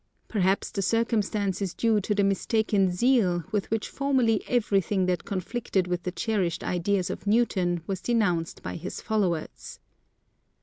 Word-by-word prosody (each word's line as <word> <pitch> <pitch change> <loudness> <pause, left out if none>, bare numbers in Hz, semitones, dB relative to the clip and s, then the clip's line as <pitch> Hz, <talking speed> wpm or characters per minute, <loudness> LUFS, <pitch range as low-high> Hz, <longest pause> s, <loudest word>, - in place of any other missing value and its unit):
Perhaps 195 -2 +1
the 200 - -2
circumstance 210 -2 0
is 190 -3 -2
due 225 -2 +2
to 210 +2 -1
the 200 - +2
mistaken 200 0 +2
zeal 180 -3 +2
with 210 -2 -1
which 225 -1 -1
formerly 260 -6 +1
everything 200 -5 +1
that 180 -1 -1
conflicted 195 0 -1
with 180 -1 -2
the 180 - -3
cherished 190 -5 -1
ideas 180 +1 0
of - - -7
Newton 185 -6 +1
was 190 -1 -3
denounced 180 -7 0
by - - -4
his 180 +3 -6
followers. 190 -7 -2
200 Hz, 145 wpm, -27 LUFS, 180-220 Hz, -, due